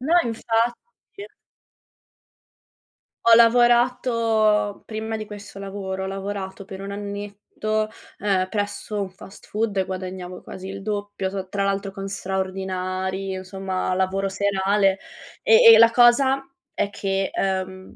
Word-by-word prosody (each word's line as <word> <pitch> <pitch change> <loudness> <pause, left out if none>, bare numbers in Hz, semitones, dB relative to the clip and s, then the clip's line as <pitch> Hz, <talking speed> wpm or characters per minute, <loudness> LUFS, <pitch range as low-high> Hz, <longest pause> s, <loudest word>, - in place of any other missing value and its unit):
No, 310 +7 +1
infatti. 235 - -3 2.0
Ho 230 -1 +8
lavorato, 230 -3 +3
prima 220 0 -4
di 215 -1 -5
questo 205 -1 -10
lavoro, 195 -1 -5
ho - - -3
lavorato 195 0 -5
per 190 0 -8
un 195 - -6
annetto, 205 +1 -4 0.3
ehm, 190 -2 0
presso 205 0 -3
un 195 -2 -3
fast 190 +1 -14
food 210 -1 -2
e 190 - +2
guadagnavo 185 -1 -6
quasi 190 0 -9
il 195 0 -7
doppio, 205 -1 -3
t 190 -1 -5
tra 200 0 -1
l'altro 195 0 -1
con 195 0 -6
straordinari, 190 0 -3
insomma 185 0 -3
lavoro 190 +1 0
serale. 195 0 +1 0.5
E 460 +1 +8
e - - +9
la 230 0 +7
cosa 265 +3 +5 0.3
è 205 - -1
che, 195 -1 -1
uhm, 190 -1 -3
200 Hz, 125 wpm, -23 LUFS, 190-215 Hz, 2.0 s, e